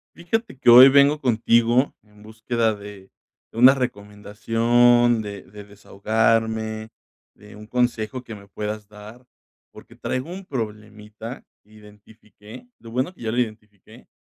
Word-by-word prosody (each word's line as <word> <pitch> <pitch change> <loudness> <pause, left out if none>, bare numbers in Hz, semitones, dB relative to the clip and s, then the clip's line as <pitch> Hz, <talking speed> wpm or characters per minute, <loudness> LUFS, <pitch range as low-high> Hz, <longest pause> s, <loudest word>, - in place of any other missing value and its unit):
Fíjate 210 - -4
que 125 - +2
hoy 125 +3 +10
vengo 140 +2 +3
contigo 120 +1 +1
en 105 -1 -23
búsqueda 110 +1 -2
de 100 -2 -13 0.4
de - - -12
una 125 +3 +7
recomendación, 115 +1 +1
de 100 -2 -8
de 105 +1 -13
desahogarme, 110 +2 -2 0.4
de 105 0 -17
un 105 0 -12
consejo 120 -1 -2
que 115 -3 -10
me 100 -1 -15
puedas 105 +1 -6
dar, 105 +4 -14 0.5
porque - - -16
traigo 130 +5 -5
un 190 +2 -9
problemita. 110 - -8 0.2
Identifiqué 105 - -17
lo 115 - -13
bueno 130 +9 -2
que - - -20
ya 110 -1 -3
lo 120 - -4
identifiqué. 105 -4 -6
110 Hz, 135 wpm, -22 LUFS, 105-120 Hz, 0.5 s, hoy